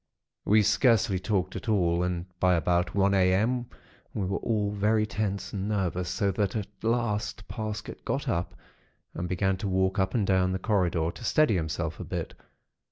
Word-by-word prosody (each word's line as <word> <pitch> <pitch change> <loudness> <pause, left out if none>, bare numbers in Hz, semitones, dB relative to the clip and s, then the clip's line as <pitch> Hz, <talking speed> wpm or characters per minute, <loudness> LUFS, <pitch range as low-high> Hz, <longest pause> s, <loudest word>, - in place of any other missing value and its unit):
"We 105 +1 +5
scarcely 105 -2 +3
talked 95 -1 -1
at 120 - -5
all, 85 -5 +2
and 90 -1 -1
by 90 -1 +4
about 90 +2 +1
one 100 0 +3
a.m. 100 +7 +2 0.5
we 100 - -1
were 95 +2 -1
all 105 -3 0
very 105 +1 +2
tense 100 -2 -3
and 100 0 -3
nervous; 90 -4 -1
so 100 -2 0
that, 100 0 -1
at 105 -3 -1 0.2
last, 110 -3 -1
Parsket 110 -2 -5
got - - -2
up 85 +1 -1 0.6
and 90 +1 -4
began 95 +1 +1
to 100 - -3
walk 95 +1 +1
up 95 +3 0
and 110 -4 +2
down 95 -1 +2
the - - 0
corridor, 90 -5 +1
to 120 - -12
steady 155 +1 +3
himself 80 -2 -2
a - - -4
bit. - - -4
95 Hz, 175 wpm, -28 LUFS, 90-105 Hz, 0.6 s, We